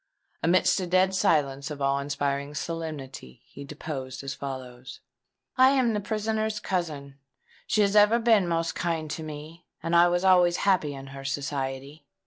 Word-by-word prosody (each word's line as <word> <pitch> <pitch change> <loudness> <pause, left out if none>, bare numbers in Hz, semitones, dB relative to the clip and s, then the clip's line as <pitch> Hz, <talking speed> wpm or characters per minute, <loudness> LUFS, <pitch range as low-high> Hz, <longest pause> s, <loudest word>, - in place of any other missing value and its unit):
Amidst 180 +4 +3
a 185 - -3
dead 185 +2 +3
silence 140 -8 +1
of 150 -2 -6
awe 140 0 +1
inspiring 140 0 -2
solemnity, 150 - -6
he 140 - -11
deposed 140 -3 -6
as 135 - -4
follows:— 130 -2 -8 0.6
"I 260 0 +7
am 240 -3 +2
the 210 - 0
prisoner's 215 +1 -2
cousin. 150 -8 -4 0.5
She 215 - +2
has 200 0 +2
ever 210 +2 +6
been 225 -5 +3
most 165 -1 -1
kind 160 -3 -2
to 160 - -4
me; 155 +2 -9 0.2
and 165 +1 0
I 170 +1 +7
was 175 +1 0
always 180 -2 +5
happy 170 -7 +2
in 135 0 -9
her 135 0 -8
society. 140 +1 -4
155 Hz, 160 wpm, -26 LUFS, 140-185 Hz, 0.6 s, I